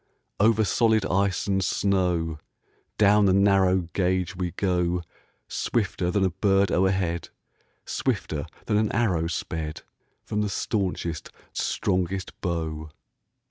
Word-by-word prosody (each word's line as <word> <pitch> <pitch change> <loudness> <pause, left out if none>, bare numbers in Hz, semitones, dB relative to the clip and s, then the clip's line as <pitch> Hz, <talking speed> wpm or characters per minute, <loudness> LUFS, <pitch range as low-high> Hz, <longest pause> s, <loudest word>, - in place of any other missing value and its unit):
Over 110 +1 +4
solid 110 +2 +2
ice 95 0 +1
and 95 -1 +1
snow, 90 -5 0 0.6
Down 105 0 +5
the 95 - +4
narrow 95 -1 +4
gauge 95 +1 0
we 90 -1 -2
go 90 -1 0 0.4
Swifter 100 -5 -1
than 95 +1 +2
a 95 - +1
bird 95 +1 +2
o'erhead, 95 -2 +1 0.6
Swifter - - -2 0.2
than 105 - +1
an 105 0 +1
arrow 90 -9 +1
sped 80 -2 -4 0.4
From 105 - -2
the 105 - 0
staunchest, 90 -6 -2 0.2
strongest 95 0 -1
bow. 80 -3 -3
95 Hz, 115 wpm, -26 LUFS, 85-100 Hz, 0.6 s, Down